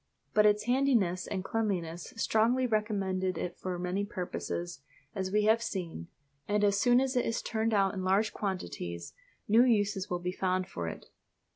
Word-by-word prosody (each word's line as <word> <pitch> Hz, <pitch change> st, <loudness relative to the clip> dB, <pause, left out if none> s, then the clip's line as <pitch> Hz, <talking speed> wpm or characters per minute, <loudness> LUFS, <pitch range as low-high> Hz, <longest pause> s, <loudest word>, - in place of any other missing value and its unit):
But 210 Hz, 0 st, +6 dB
its 210 Hz, 0 st, +3 dB
handiness 235 Hz, -8 st, +2 dB
and 190 Hz, -2 st, -3 dB
cleanliness 180 Hz, -6 st, -2 dB
strongly 230 Hz, +3 st, +2 dB
recommend 210 Hz, -5 st, 0 dB
it 180 Hz, -1 st, -2 dB
for 185 Hz, -1 st, -3 dB
many 180 Hz, +3 st, -1 dB
purposes, 175 Hz, -5 st, -4 dB, 0.3 s
as 190 Hz, -1 st, -3 dB
we 210 Hz, +1 st, +3 dB
have 220 Hz, +2 st, +4 dB
seen; 170 Hz, -, -4 dB, 0.4 s
and 210 Hz, 0 st, +1 dB
as 200 Hz, -1 st, +3 dB
soon 245 Hz, +2 st, +5 dB
as 265 Hz, 0 st, 0 dB
it 245 Hz, -, +3 dB
is 230 Hz, -, -2 dB
turned 225 Hz, 0 st, 0 dB
out 195 Hz, -3 st, +3 dB
in 190 Hz, -2 st, -4 dB
large 195 Hz, +4 st, +2 dB
quantities 90 Hz, -, -4 dB, 0.3 s
new 225 Hz, +4 st, +6 dB
uses 205 Hz, -5 st, +1 dB
will 180 Hz, -, 0 dB
be 180 Hz, +1 st, -3 dB
found 185 Hz, 0 st, -1 dB
for 85 Hz, -, -5 dB
it. -, -, -7 dB
200 Hz, 170 wpm, -30 LUFS, 180-220 Hz, 0.4 s, But